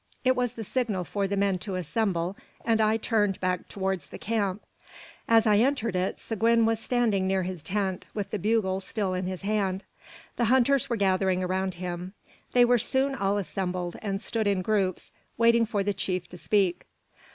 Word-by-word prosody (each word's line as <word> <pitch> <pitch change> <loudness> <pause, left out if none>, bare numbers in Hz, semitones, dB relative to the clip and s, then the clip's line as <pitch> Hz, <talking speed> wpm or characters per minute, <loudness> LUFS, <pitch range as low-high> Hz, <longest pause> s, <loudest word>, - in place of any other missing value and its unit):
It 255 0 +4
was 245 -2 0
the 230 - -6
signal 215 -5 -1
for 200 +2 -2
the 200 +1 -2
men 195 -2 +1
to 190 +1 -4
assemble, 185 0 -1 0.3
and 225 -1 +3
I 215 +1 +3
turned 210 -4 +1
back 185 -1 -1
towards 190 -2 -3
the - - -9
camp. 205 -3 -1 0.7
As 225 0 +5
I 210 -2 +5
re - - +4
entered 240 -7 0
it, 185 +1 -1
Seguin 230 +1 +2
was 225 -1 +1
standing 225 -6 +1
near 190 0 +1
his 180 -2 -4
tent, 190 +1 -2
with 205 -2 -3
the 210 - -2
bugle 205 -2 +1
still 195 0 -2
in 185 0 -2
his 185 0 -5
hand. 195 -2 0 0.5
The 240 - +2
hunters 260 +3 +3
were 235 - +1
gathering 190 -2 +2
around 185 0 -1
him. 180 +2 -5 0.4
They 245 -1 +6
were 245 0 +4
soon 265 +4 +1
all 200 -5 0
assembled, 180 -1 -3
and 195 -2 -2
stood 220 0 -1
in 195 -2 +1
groups, 195 -3 0 0.3
waiting 230 0 +4
for 205 -3 0
the 205 +1 0
chief 185 -2 -2
to 180 - -10
speak. 180 +1 +1
200 Hz, 190 wpm, -27 LUFS, 185-225 Hz, 0.7 s, They